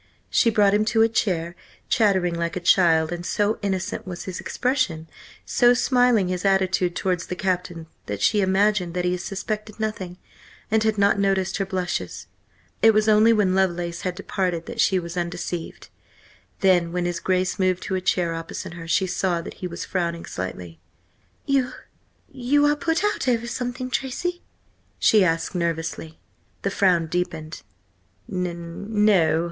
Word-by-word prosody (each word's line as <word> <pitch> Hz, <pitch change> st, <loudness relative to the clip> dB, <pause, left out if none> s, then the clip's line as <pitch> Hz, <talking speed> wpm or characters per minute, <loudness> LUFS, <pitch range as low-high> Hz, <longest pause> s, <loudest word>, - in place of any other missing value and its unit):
She 230 Hz, -, +4 dB
brought 205 Hz, -2 st, +3 dB
him 210 Hz, +1 st, +3 dB
to 225 Hz, +1 st, +3 dB
a -, -, +5 dB
chair, 175 Hz, -6 st, -1 dB, 0.3 s
chattering 190 Hz, -7 st, +2 dB
like 170 Hz, 0 st, -2 dB
a -, -, -1 dB
child, 170 Hz, -3 st, +4 dB
and 175 Hz, 0 st, -4 dB
so 205 Hz, +3 st, 0 dB
innocent 195 Hz, +1 st, -3 dB
was 175 Hz, -1 st, -6 dB
his 185 Hz, -1 st, -6 dB
expression, 245 Hz, -, -1 dB, 0.4 s
so 245 Hz, 0 st, +4 dB
smiling 245 Hz, -6 st, +3 dB
his 180 Hz, -1 st, -2 dB
attitude 190 Hz, -2 st, +2 dB
towards 180 Hz, -3 st, -1 dB
the 180 Hz, -, -4 dB
Captain, 180 Hz, -2 st, -2 dB, 0.2 s
that 105 Hz, -1 st, -4 dB
she 205 Hz, -, +3 dB
imagined 190 Hz, -2 st, +1 dB
that 180 Hz, 0 st, -1 dB
he 180 Hz, 0 st, +1 dB
suspected 210 Hz, +4 st, -5 dB
nothing, 195 Hz, -5 st, -4 dB, 0.5 s
and 220 Hz, 0 st, +3 dB
had 220 Hz, -1 st, +1 dB
not 200 Hz, 0 st, +3 dB
noticed 195 Hz, -1 st, +1 dB
her 195 Hz, -1 st, -2 dB
blushes. 185 Hz, -2 st, -3 dB, 0.6 s
It 225 Hz, -1 st, +6 dB
was 215 Hz, 0 st, +3 dB
only 215 Hz, +1 st, +6 dB
when 205 Hz, -4 st, +3 dB
Lovelace 175 Hz, -2 st, 0 dB
had 180 Hz, -1 st, -3 dB
departed 180 Hz, -3 st, -2 dB
that -, -, -2 dB
she 190 Hz, -, +3 dB
was 170 Hz, -1 st, -5 dB
undeceived. 175 Hz, -1 st, -4 dB, 0.7 s
Then, 180 Hz, -3 st, +3 dB
when 180 Hz, 0 st, -1 dB
his 175 Hz, -1 st, -2 dB
Grace 185 Hz, 0 st, 0 dB
moved 185 Hz, -1 st, +1 dB
to -, -, -4 dB
a 185 Hz, -, 0 dB
chair 180 Hz, -2 st, +1 dB
opposite 165 Hz, +1 st, -6 dB
her, 165 Hz, -1 st, -9 dB
she 180 Hz, +4 st, +2 dB
saw 180 Hz, -1 st, 0 dB
that -, -, -8 dB
he 180 Hz, -, -2 dB
was 170 Hz, 0 st, -6 dB
frowning 170 Hz, -3 st, -2 dB
slightly. 90 Hz, -2 st, -6 dB, 0.7 s
"You–you 275 Hz, +1 st, -1 dB
are 295 Hz, 0 st, +3 dB
put 325 Hz, +4 st, -1 dB
out 415 Hz, -9 st, 0 dB
over 235 Hz, -2 st, +1 dB
something, 250 Hz, +1 st, -4 dB
Tracy?" 350 Hz, +8 st, -2 dB, 0.6 s
she 215 Hz, -3 st, +5 dB
asked 165 Hz, 0 st, 0 dB
nervously. 165 Hz, -2 st, -3 dB, 0.4 s
The 200 Hz, -, 0 dB
frown 180 Hz, -4 st, +3 dB
deepened. 160 Hz, -2 st, -4 dB, 0.7 s
"N 180 Hz, +3 st, -2 dB
no. 165 Hz, -7 st, +4 dB
185 Hz, 160 wpm, -23 LUFS, 175-215 Hz, 0.7 s, It